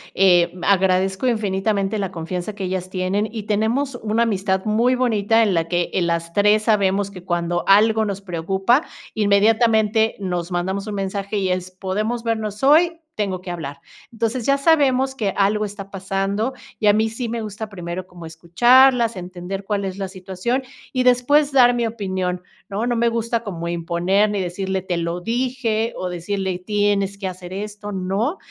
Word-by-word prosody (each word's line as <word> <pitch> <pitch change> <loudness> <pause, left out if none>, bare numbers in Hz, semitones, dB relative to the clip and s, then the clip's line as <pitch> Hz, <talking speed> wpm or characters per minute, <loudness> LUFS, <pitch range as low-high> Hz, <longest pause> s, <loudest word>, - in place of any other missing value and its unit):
Eh, 175 -2 +4
agradezco 190 +2 +2
infinitamente 205 -2 0
la 195 -2 -2
confianza 180 +4 -5
que 200 - -5
ellas 185 0 -3
tienen, 190 +3 -1
y 220 -3 -5
tenemos 225 +6 0
una 220 +2 +1
amistad 190 -3 0
muy 230 +4 +2
bonita 225 -2 +2
en 205 - +1
la 165 -1 0
que, 175 0 -1
eh, - - +1
las 170 -1 -1
tres 210 +1 +3
sabemos 200 -2 +1
que, 180 -3 -11
cuando 175 0 -1
algo 220 +2 +5
nos 200 -1 -4
preocupa, 190 - +1 0.3
inmediatamente 220 +1 +3
nos 180 -2 -3
mandamos 190 +4 -2
un 210 - -4
mensaje 200 +1 -3
y 190 -2 0
es: 185 0 -2
"¿Podemos 210 +6 -3
vernos 220 -2 -3
hoy? 330 +4 +4
Tengo 195 -3 -2
que 185 - -6
hablar". 145 -5 -6 0.3
Entonces, 230 +2 -2
ya 275 0 +4
sabemos 275 -4 +3
que 215 -7 -1
algo 205 +2 +2
está 200 -1 -7
pasando 195 +5 -2 0.3
y 210 - +1
a 205 - +7
mí 220 +1 +2
sí 230 +1 -4
me 230 0 -3
gusta 215 +1 -6
primero 180 -1 -6
como 175 -2 -11
escucharlas, 235 +9 +4
entender 185 +1 -6
cuál 200 -1 -2
es 190 0 -5
la 195 - -2
situación 190 +7 -3 0.3
y, 255 -1 0
después, 255 +4 +3
dar 245 -3 +5
mi 235 -1 0
opinión, 185 -5 -3 0.3
¿no? 210 +5 -2
No 240 - 0
me 235 0 +2
gusta 230 0 -1
como 170 -5 -5
imponer 175 +4 +1
ni 205 - -1
decirle: 190 +1 -2
"te 180 -1 -3
lo 170 +1 -2
dije", 235 0 -1
o 185 - -3
decirle: 185 +1 -3
"tienes 200 0 0
que 195 - -4
hacer 180 -1 -8
esto", 205 +1 -6
¿no? 195 - -1
200 Hz, 175 wpm, -21 LUFS, 185-225 Hz, 0.3 s, a